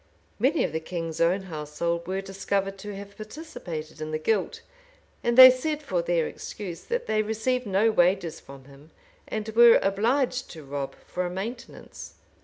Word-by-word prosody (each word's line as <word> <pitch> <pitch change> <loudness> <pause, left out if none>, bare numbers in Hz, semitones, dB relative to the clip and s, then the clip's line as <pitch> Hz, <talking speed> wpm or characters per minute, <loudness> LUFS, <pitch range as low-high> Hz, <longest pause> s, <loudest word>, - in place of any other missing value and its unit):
Many 275 +8 +2
of - - -1
the 160 - -2
king's 165 0 -5
own 180 +4 +2
household 170 0 -3
were 190 +1 -2
discovered 195 0 -2
to 205 0 -7
have 200 0 -10
participated 185 - -8
in 155 - -4
the 155 - -1
guilt; 195 +5 -1 0.6
and 235 0 +1
they 255 0 +12
said 300 +4 -3
for 185 -10 -1
their 170 -1 +1
excuse, 180 -5 -7
that 485 +1 -2
they 215 - +1
received 220 +3 -1
no 200 +3 +3
wages 175 -3 +2
from 135 -1 -13
him, 140 +2 -16 0.4
and 215 0 -4
were 235 +1 +7
obliged 245 +7 0
to 160 - -10
rob 140 0 -5
for 180 - -3
a 175 - -2
maintenance. 225 +8 -8
195 Hz, 170 wpm, -26 LUFS, 165-225 Hz, 0.6 s, they